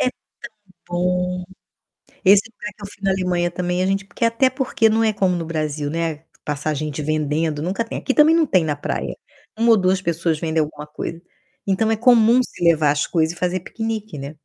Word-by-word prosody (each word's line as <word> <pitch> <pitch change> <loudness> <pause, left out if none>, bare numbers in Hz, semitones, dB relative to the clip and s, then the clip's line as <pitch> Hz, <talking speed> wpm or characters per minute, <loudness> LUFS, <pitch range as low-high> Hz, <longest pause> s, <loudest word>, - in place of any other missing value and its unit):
É - - +2
tão - - -31 0.8
bom. 180 +1 -1 0.8
Esse 200 +1 +7
lugar 235 0 -8
que 210 - -16
eu - - -5
fui 200 0 -14
na 195 - +2
Alemanha 180 -2 0
também 180 +1 -1
a - - +1
gente 195 0 0
porque 200 - -4
até 230 +3 +3
porque 250 -5 +1
não 220 +1 +2
é 220 - +3
como 190 -3 +1
no 170 - -3
Brasil, 155 -2 -3
né, 165 -1 -3 0.2
passar 150 +1 -2
gente 150 0 -4
vendendo, 155 0 -1
nunca 195 +7 -1
tem, - - -5
aqui 270 - -1
também 310 +2 +6
não 330 -2 +3
tem 185 - +2
na 150 -2 -1
praia. 145 - -3 0.4
1 230 +1 +3
ou 225 - +7
2 185 -1 +2
pessoas 170 -2 -1
vendem 160 -1 0
alguma 150 0 -6
coisa. 155 +2 -6 0.5
Então, 200 +3 +1
é - - +1
comum 235 +1 +5
se 175 - -6
levar 160 -3 +4
as 145 0 0
coisas 165 0 0
e - - -14
fazer 180 +1 -1
piquenique, 220 -3 -5
né? 140 +1 -6
180 Hz, 210 wpm, -21 LUFS, 155-215 Hz, 0.8 s, Esse